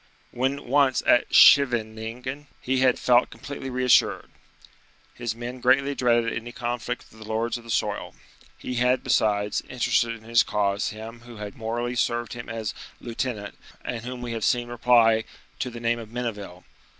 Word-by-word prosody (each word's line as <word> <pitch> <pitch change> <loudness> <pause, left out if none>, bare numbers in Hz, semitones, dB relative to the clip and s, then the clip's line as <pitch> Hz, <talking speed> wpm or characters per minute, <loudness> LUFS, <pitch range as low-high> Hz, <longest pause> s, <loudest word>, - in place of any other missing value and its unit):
When 135 +3 -2
once 135 0 +3
at 120 - +4
Scheveningen 125 +2 +4
he 130 +1 0
had 130 -1 +3
felt 125 0 +3
completely 140 -1 -7
reassured. 125 0 +2 0.8
His 120 -2 -4
men 120 +2 -6
greatly 135 +3 +3
dreaded 120 -3 +2
any 115 +1 -5
conflict 120 0 -4
with 110 - -16
the 110 - -10
lords 110 +2 -1
of 120 - -7
the 115 - -14
soil. - - -2 0.4
He 125 - -5
had, 125 +1 +2
besides, 105 -1 +1
interested 120 -2 +1
in 110 - -15
his 115 0 +4
cause 100 0 0
him 110 +2 -9
who 120 -1 -13
had 105 -1 -7
morally 120 +2 -3
served 120 0 -1
him 120 -1 -8
as 115 -2 -4 0.3
lieutenant, 115 -3 -4 0.3
and 120 -2 -3
whom 125 0 -6
we 120 - -4
have 115 -2 -4
seen 120 +2 +1
reply 115 -2 +4 0.4
to 130 - -2
the 120 -1 -8
name 120 0 0
of 110 -2 -9
Menneville. 105 -7 -5
120 Hz, 165 wpm, -25 LUFS, 115-125 Hz, 0.8 s, at